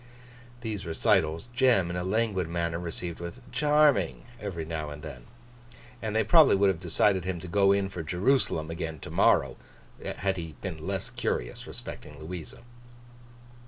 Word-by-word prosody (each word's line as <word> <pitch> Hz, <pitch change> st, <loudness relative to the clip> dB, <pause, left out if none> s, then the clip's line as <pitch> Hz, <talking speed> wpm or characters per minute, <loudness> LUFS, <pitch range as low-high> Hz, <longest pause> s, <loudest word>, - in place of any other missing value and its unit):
These 110 Hz, -4 st, -4 dB
recitals, 80 Hz, +3 st, +1 dB
Jem, 120 Hz, -9 st, +3 dB
in -, -, -4 dB
a 90 Hz, -, -2 dB
languid 95 Hz, -3 st, 0 dB
manner, 85 Hz, -1 st, -1 dB
received 85 Hz, 0 st, -4 dB
with 85 Hz, +8 st, -7 dB
'charming!' 150 Hz, +2 st, +3 dB, 0.2 s
every 90 Hz, -6 st, -4 dB
now 80 Hz, -2 st, -4 dB
and 75 Hz, 0 st, -9 dB
then; 60 Hz, -1 st, -8 dB, 0.8 s
and 110 Hz, -1 st, -3 dB
they 110 Hz, -, +4 dB
probably 160 Hz, -, +7 dB
would 100 Hz, 0 st, +4 dB
have 90 Hz, -4 st, -1 dB
decided 95 Hz, +1 st, +2 dB
him 90 Hz, -1 st, -3 dB
to 90 Hz, -, -8 dB
'go 100 Hz, +2 st, +4 dB
in' 100 Hz, 0 st, +2 dB
for 90 Hz, -3 st, -6 dB
Jerusalem 90 Hz, -, +1 dB
again 80 Hz, -1 st, -4 dB
to -, -, -8 dB
morrow -, -, +3 dB, 0.4 s
morning, -, -, -5 dB
had 95 Hz, 0 st, 0 dB
he 80 Hz, -3 st, -6 dB
been -, -, -6 dB
less -, -, -3 dB
curious -, -, -3 dB
respecting 75 Hz, -1 st, -8 dB
Louisa. 85 Hz, +6 st, -8 dB
90 Hz, 160 wpm, -28 LUFS, 80-105 Hz, 0.8 s, probably